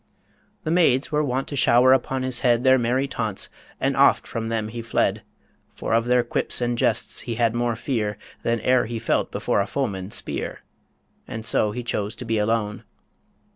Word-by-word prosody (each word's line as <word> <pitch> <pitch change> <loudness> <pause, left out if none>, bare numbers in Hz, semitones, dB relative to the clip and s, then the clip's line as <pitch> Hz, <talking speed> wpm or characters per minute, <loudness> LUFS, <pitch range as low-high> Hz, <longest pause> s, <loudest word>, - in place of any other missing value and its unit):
The 155 - -2
maids 150 -7 +3
were 150 0 +2
wont 135 -1 -1
to 145 - -4
shower 125 0 +5
upon 130 0 0
his 130 -1 +1
head 120 -2 +2
Their 130 0 +5
merry 125 +3 +1
taunts, 110 -6 -3 0.3
and - - 0
oft - - +4
from 115 -1 -4
them 110 -1 -2
he 115 +1 -6
fled; 115 - 0 0.5
For - - -3
of 115 0 +3
their 125 0 +3
quips - - -1
and 120 -1 0
jests - - +1
he 115 - -4
had 115 -1 +2
more 120 -1 0
fear 110 -4 -2 0.2
Than 115 -1 0
e'er 125 -1 +3
he 115 0 -4
felt 115 - 0
before - - 0
a 100 - -2
foeman's 100 -7 -3
spear - - -4 0.7
And 110 0 -6
so 105 - +2
he 120 +4 -5
chose 105 -3 -2
to 125 - -8
be 115 -1 0
alone. 105 -1 -1
120 Hz, 190 wpm, -23 LUFS, 110-130 Hz, 0.7 s, shower